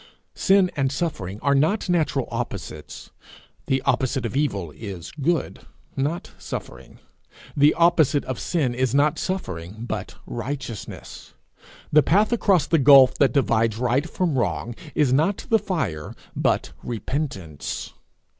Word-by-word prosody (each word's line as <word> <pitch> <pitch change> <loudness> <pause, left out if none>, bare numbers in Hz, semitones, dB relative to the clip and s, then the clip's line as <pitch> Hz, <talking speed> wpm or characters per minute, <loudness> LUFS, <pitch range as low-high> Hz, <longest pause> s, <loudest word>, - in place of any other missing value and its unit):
Sin 195 -2 +3
and 135 -2 0
suffering 110 - -3
are 140 +1 +2
not 160 +11 +2
natural 155 -7 +1
opposites; 100 -10 -6 0.6
the 130 0 +1
opposite 130 -1 0
of 115 - -4
evil 100 - -1
is 95 -1 -8
good, 160 +3 -1 0.4
not 145 +6 -2
suffering; - - -8 0.6
the 145 +1 +5
opposite 165 -4 +3
of 130 - -4
sin 150 -8 0
is 130 0 0
not 145 +1 +3
suffering, 105 - -4
but - - -5
righteousness. 120 - -7 0.6
The 150 - +7
path 205 - +3
across 195 -9 +3
the 165 - +2
gulf 135 -2 +8
that 135 -4 +4
divides 115 -4 +2
right 125 +6 0
from 165 -8 0
wrong 90 0 -1 0.2
is 140 -4 +3
not 165 +9 +1
the 225 - +5
fire, 125 - -3 0.2
but - - 0
repentance. 110 - -4
135 Hz, 130 wpm, -23 LUFS, 115-160 Hz, 0.6 s, gulf